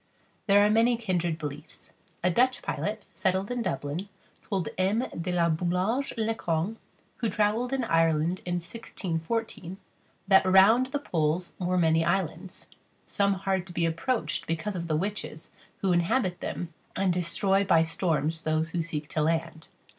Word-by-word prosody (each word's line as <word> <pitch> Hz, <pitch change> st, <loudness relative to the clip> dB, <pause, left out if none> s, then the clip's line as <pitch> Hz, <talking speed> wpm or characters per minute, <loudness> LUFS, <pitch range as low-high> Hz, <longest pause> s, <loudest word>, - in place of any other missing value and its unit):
There 205 Hz, 0 st, +6 dB
are -, -, +3 dB
many 230 Hz, +2 st, +4 dB
kindred 175 Hz, -7 st, -1 dB
beliefs. 150 Hz, 0 st, -8 dB, 0.3 s
A 180 Hz, -, +3 dB
Dutch 255 Hz, +6 st, +2 dB
pilot, -, -, -3 dB
settled 190 Hz, +2 st, 0 dB
in 245 Hz, -1 st, -1 dB
Dublin, 180 Hz, -1 st, -3 dB, 0.3 s
told 190 Hz, -6 st, -2 dB
M. 200 Hz, +7 st, +1 dB
De 170 Hz, +2 st, -4 dB
La 175 Hz, -1 st, +2 dB
Boullage 180 Hz, -, 0 dB
Le 225 Hz, 0 st, +1 dB
Cong, 175 Hz, +1 st, -2 dB, 0.4 s
who 230 Hz, -, -1 dB
travelled 215 Hz, +5 st, +1 dB
in 270 Hz, -2 st, 0 dB
Ireland 165 Hz, -2 st, +2 dB
in 175 Hz, 0 st, -2 dB
1614, 185 Hz, +1 st, -4 dB, 0.5 s
that 190 Hz, -1 st, +6 dB
round 195 Hz, +7 st, +6 dB
the 265 Hz, -, -2 dB
poles 170 Hz, -, -1 dB
were 180 Hz, 0 st, 0 dB
many 165 Hz, -1 st, +3 dB
islands; 175 Hz, +1 st, -2 dB, 0.4 s
some 200 Hz, -1 st, +1 dB
hard 190 Hz, -1 st, -1 dB
to 175 Hz, -, -10 dB
be 170 Hz, -1 st, +1 dB
approached 165 Hz, -, -1 dB
because 165 Hz, +5 st, -2 dB
of 170 Hz, -1 st, -4 dB
the 155 Hz, -2 st, +1 dB
witches 195 Hz, -3 st, -4 dB, 0.3 s
who 190 Hz, -2 st, +2 dB
inhabit 180 Hz, +2 st, +1 dB
them 170 Hz, -2 st, -5 dB, 0.2 s
and 190 Hz, -2 st, +1 dB
destroy 190 Hz, +3 st, +1 dB
by 165 Hz, -4 st, +4 dB
storms 165 Hz, -1 st, 0 dB
those 160 Hz, +1 st, 0 dB
who 175 Hz, -, -1 dB
seek 155 Hz, -2 st, -4 dB
to 155 Hz, -, -1 dB
land. 160 Hz, +1 st, -1 dB
180 Hz, 155 wpm, -28 LUFS, 165-205 Hz, 0.5 s, There